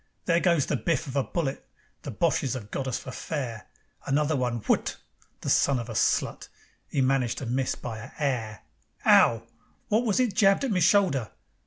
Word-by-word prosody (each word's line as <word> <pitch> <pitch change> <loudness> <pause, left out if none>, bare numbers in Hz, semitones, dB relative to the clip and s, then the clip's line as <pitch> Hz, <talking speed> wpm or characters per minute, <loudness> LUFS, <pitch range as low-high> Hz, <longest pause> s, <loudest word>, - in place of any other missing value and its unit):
There 170 -1 +3
goes 170 -5 +2
the - - -1
biff 165 -2 -1
of 135 -2 -7
a 140 - +3
bullet. 145 -4 -3 0.4
The - - -7
Boches 130 -1 0
have 105 -5 -8
got 135 - -3
us 130 - -1
for 130 - -8
fair. 120 -5 -5 0.4
Another 150 +3 +1
one 125 -3 -1
WHUT! - - 0 0.4
The - - -3
son 140 -2 +3
of 120 -1 -5
a - - -5
slut! - - 0 0.4
'E 140 - +1
managed 130 -3 +1
to 135 - -5
miss 130 +2 -1
by 110 -3 -6
a 110 - -9
'air. 120 -8 -2 0.4
'Ow! 115 -1 +5 0.5
Wot 220 +2 +2
was 220 -2 +1
it 245 -5 +1
jabbed 195 +3 +4
at 270 - 0
me 185 - +2
shoulder? 170 - +3
135 Hz, 190 wpm, -27 LUFS, 120-170 Hz, 0.5 s, Ow